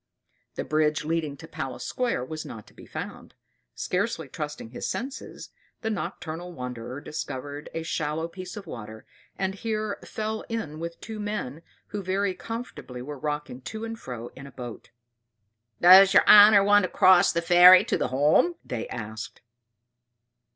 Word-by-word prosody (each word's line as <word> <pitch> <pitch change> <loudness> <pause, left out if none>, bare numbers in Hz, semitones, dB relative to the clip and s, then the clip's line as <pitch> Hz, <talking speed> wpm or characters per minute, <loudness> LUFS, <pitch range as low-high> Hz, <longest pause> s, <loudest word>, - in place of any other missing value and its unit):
The - - -3
bridge 155 0 +1
leading 155 -3 -2
to 160 - -11
Palace 135 -5 -6
Square 240 - -1
was 155 +3 -6
not 110 -3 -9
to - - -20
be - - -14
found; - - -8 0.4
scarcely - - -2
trusting 150 -6 -6
his 125 - -5
senses, 270 +3 -6 0.3
the 220 - -2
nocturnal 175 -3 -5
wanderer 125 -1 -6
discovered 145 -1 -6
a 165 - -3
shallow 160 0 -2
piece 185 +4 -9
of 200 - -8
water, 110 -7 -9 0.3
and 190 0 -1
here 215 0 -3
fell 220 0 -4
in 155 -10 -4
with 170 0 -6
two 220 -1 -7
men 205 -9 -4 0.3
who 205 0 -4
very 190 +1 0
comfortably 225 - -7
were 145 +1 -7
rocking 150 -3 -4
to 220 - -6
and 225 0 -6
fro 120 - -7
in 140 +1 -10
a - - -12
boat. 120 -3 -9 0.9
"Does 190 +2 +8
your - - +6
honor 205 -1 +9
want 205 +1 +5
to 185 - -1
cross 185 0 +5
the 170 0 -1
ferry 180 +3 +8
to - - 0
the - - 0
Holme?" 150 - +3 0.4
asked 110 -1 -6
they. - - -25
165 Hz, 160 wpm, -26 LUFS, 140-205 Hz, 0.9 s, honor